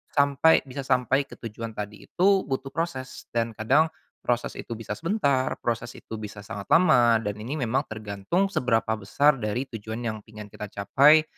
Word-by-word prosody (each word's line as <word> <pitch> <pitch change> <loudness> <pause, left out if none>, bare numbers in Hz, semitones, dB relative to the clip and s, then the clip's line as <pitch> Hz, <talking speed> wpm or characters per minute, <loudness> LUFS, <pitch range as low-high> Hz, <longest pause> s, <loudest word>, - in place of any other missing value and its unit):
sampai 140 +2 +5
bisa 135 +2 -7
sampai 130 +2 +2
ke - - -11
tujuan 115 0 -6
tadi 105 0 -6
itu 185 +2 +2 0.2
butuh 135 0 -2
proses 135 -6 -4
dan 115 0 +1
kadang 135 +9 +3 0.4
proses 120 -1 -1
itu 115 - -5
bisa 110 -1 -8
sebentar, 145 -8 +1
proses 120 -1 -1
itu 110 - -8
bisa 105 -1 -7
sangat 100 -2 -7
lama, 125 -10 +6
dan 105 0 -2
ini 125 +8 -4
memang 130 +5 +1
tergantung 110 - -1
seberapa 115 - +1
besar 140 +9 +3
dari 110 +3 -1
tujuan 110 +2 -5
yang 110 -2 -2
pengen 105 -1 -10
kita 105 - -7
capai. 140 +11 +5
120 Hz, 170 wpm, -26 LUFS, 110-140 Hz, 0.4 s, lama